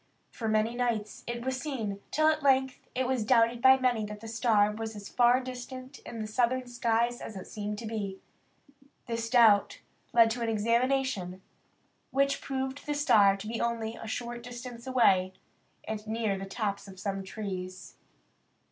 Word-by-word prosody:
For 225 - -4
many 215 +1 +2
nights 235 -4 -2
it 235 0 -4
was 260 0 -1
seen, 225 -10 -3
till 310 - +1
at 310 0 +3
length 265 -1 +3 0.2
it 260 +1 +1
was 255 -3 0
doubted 230 0 +3
by 265 +1 +8
many 250 -4 +1
that 210 0 -7
the 225 - -9
star 220 -2 +3
was 220 +1 -5
as 205 -1 -8
far 245 +1 +4
distant 255 +1 -8
in 235 - -9
the 215 - -3
southern 250 +3 +1
skies 240 0 0
as 220 - -7
it 190 - -7
seemed 210 0 -5
to 230 - -7
be. 205 -3 -4 0.9
This 230 -1 -3
doubt 225 -5 +5 0.3
led 230 -1 +6
to 240 +2 -3
an 230 - 0
examination, 230 -4 0 0.7
which 275 +1 +1
proved 265 +1 -4
the 295 - 0
star 205 -9 +5
to 195 - -8
be 225 +1 -3
only 230 -1 -1
a 225 - -8
short 240 +1 -4
distance 240 0 -9
away, 190 -8 +3 0.5
and 215 0 -5
near 220 -2 0
the 195 0 -5
tops 200 0 -3
of 190 -1 -11
some 195 0 -3
trees. 185 -2 -6
230 Hz, 175 wpm, -29 LUFS, 210-255 Hz, 0.9 s, by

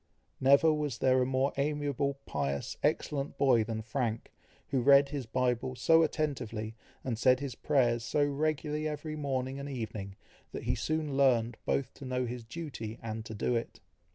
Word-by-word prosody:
Never 140 +4 +5
was 150 -5 -2
there 130 +1 +3
a 125 - +1
more 130 +1 +1
amiable, 140 -1 0
pious, 70 -1 -2
excellent 140 -1 -1
boy 125 -5 +4
than 110 0 -4
Frank, 115 -1 -2 0.4
who 135 -3 +1
read 140 +2 +6
his 140 -5 -4
Bible 125 +1 0
so 165 +5 +5
attentively, 125 -9 -2 0.3
and 115 -4 -3
said 130 +1 +5
his 140 -2 -4
prayers 120 -4 +1
so 145 +4 +2
regularly 150 +1 -1
every 155 +1 -4
morning 135 -2 -2
and 140 +1 -5
evening, 110 -6 -5 0.4
that - - -5
he - - +1
soon 155 -3 -1
learned 120 -4 +3
both 140 - 0
to 140 - -10
know 125 0 -1
his 120 0 -5
duty 115 -4 -6
and 110 -1 -4
to 110 - -7
do 120 +4 0
it. 115 - -3
130 Hz, 170 wpm, -31 LUFS, 115-145 Hz, 0.4 s, read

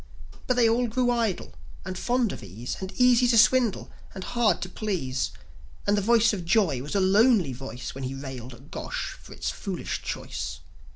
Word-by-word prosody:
But 255 - +2
they 240 -2 +5
all 240 +2 +2
grew 245 +2 +1
idle, 230 -6 -1 0.3
and 185 - -4
fond 240 +2 +1
of - - -7
ease, 105 +6 -6
And 190 0 -5
easy 250 +1 +5
to 235 -1 +4
swindle, 240 -1 +4 0.2
and 190 - -5
hard 230 -6 +2
to - - -4
please; 155 - -2 0.6
And 205 - +3
the 205 - +1
voice 230 +1 +4
of 190 -4 -3
Joi 170 - +2
was 145 +8 -5
a - - +4
lonely 195 - +4
voice, 130 0 -7
When 135 0 -5
he 130 +1 -4
railed 130 -3 -7
at 135 +5 -18
Gosh - - -4
for - - -15
its - - -3
foolish - - -4
choice. - - -5
200 Hz, 190 wpm, -26 LUFS, -, 0.6 s, they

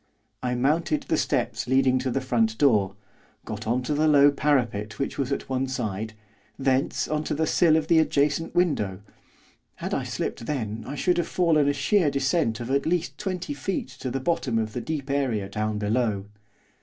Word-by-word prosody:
I 125 -1 -1
mounted 150 +4 +1
the - - 0
steps - - -1
leading 130 0 +3
to 130 0 -2
the 135 +2 -1
front 115 -4 +1
door, 105 -9 +3 0.5
got 110 0 -6
on 125 +3 +1
to 150 - -1
the 155 +2 +2
low 145 -1 +6
parapet 120 -8 0
which 135 - -3
was 135 -1 -1
at 140 - -2
one 130 0 -1
side, 110 -4 -3 0.4
thence 135 0 +1
on 155 0 -1
to - - -1
the 160 +2 +1
sill 160 0 +4
of 160 - 0
the 165 0 +4
adjacent 150 +1 +1
window, 105 - +1 0.7
had - - -5
I - - 0
slipped 115 - -4
then 110 -7 -3
I 140 - -5
should 175 +4 +1
have 170 - -1
fallen 160 -5 +3
a - - +2
sheer 150 +4 +2
descent 140 -4 0
of 120 +2 -4
at 140 +2 +1
least 170 0 -1
twenty 190 +5 -3
feet 195 - -3
to 130 - -3
the 135 +2 -2
bottom 130 -5 0
of 110 -1 -1
the 120 - -3
deep 150 -2 -4
area 125 -8 0
down 105 +1 -2
below. 105 -1 0
135 Hz, 195 wpm, -25 LUFS, 115-150 Hz, 0.7 s, low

